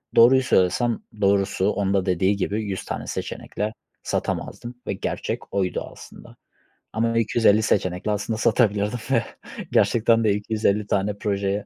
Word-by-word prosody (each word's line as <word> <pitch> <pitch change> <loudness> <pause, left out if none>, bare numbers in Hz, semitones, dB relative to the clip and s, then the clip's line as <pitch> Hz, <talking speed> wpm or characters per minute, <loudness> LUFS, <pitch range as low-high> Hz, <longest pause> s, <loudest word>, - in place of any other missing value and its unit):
doğruyu 125 +3 +7
söylesem, 115 +2 +2 0.2
doğrusu 100 0 +2
onun 100 -2 0
da 95 -2 +1
dediği 95 +2 +2
gibi, 105 +3 -2
100 100 -2 -4
tane - - -5
seçenekle 105 +1 -4 0.3
satamazdım 120 +1 -3
ve - - 0
gerçek - - -4
oydu 95 -2 0
aslında - - -14 0.6
ama 115 +1 0
250 110 -1 +3
seçenekle 95 -1 0
aslında 105 +2 -2
satabilirdim 110 0 +1
ve 115 -4 +3 0.5
gerçekten 115 0 +3
de 105 - +3
250 105 0 0
tane 100 0 0
projeye 100 0 -1
105 Hz, 135 wpm, -23 LUFS, 100-115 Hz, 0.6 s, doğruyu